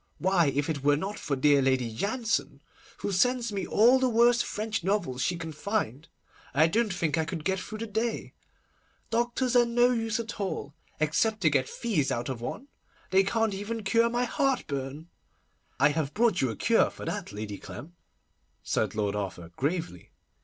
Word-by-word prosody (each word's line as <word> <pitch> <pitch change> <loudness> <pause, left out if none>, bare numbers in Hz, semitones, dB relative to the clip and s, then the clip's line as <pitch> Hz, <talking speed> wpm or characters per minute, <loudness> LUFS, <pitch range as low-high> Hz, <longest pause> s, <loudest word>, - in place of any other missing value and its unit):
Why, 185 -3 +3
if 140 +1 0
it 150 -4 -3
were 145 0 +4
not 195 +6 -4
for 145 - -2
dear 140 +1 +4
Lady 130 -3 +1
Jansen, 220 - -2 0.3
who - - -3
sends 240 +4 +2
me 195 -2 -3
all 240 +5 +5
the 260 -1 +2
worst 240 +1 +4
French 215 -2 -3
novels 180 -10 0
she 180 - +1
can 165 -1 -6
find, 160 - -3 0.5
I 155 +3 +6
don't 215 +6 +1
think 165 -3 0
I - - +2
could 165 -2 -5
get 190 0 +1
through 215 +3 -7
the 225 - -4
day. 225 +2 -2 0.8
Doctors 240 +2 0
are 245 - +7
no 240 +1 +3
use 225 -2 -1
at 230 -1 -5
all, 185 -7 -3 0.3
except 210 +8 +1
to 160 -4 +4
get 135 -3 +1
fees 195 - -1
out 120 +3 -2
of 125 -3 -4
one. 210 - -5 0.4
They 190 +1 +6
can't 225 +1 0
even 210 +3 -4
cure 230 +4 +3
my 240 +1 0
heartburn.' 150 - -2 0.7
'I 145 +2 +6
have 150 -1 -2
brought 220 -4 +3
you 130 - +1
a 110 - -4
cure - - +3
for - - -9
that, - - -4
Lady 105 -1 -6
Clem,' 145 - -9 0.7
said - - -1
Lord 105 -1 0
Arthur 95 -4 -5
gravely. 145 - -3
190 Hz, 180 wpm, -28 LUFS, 140-225 Hz, 0.8 s, are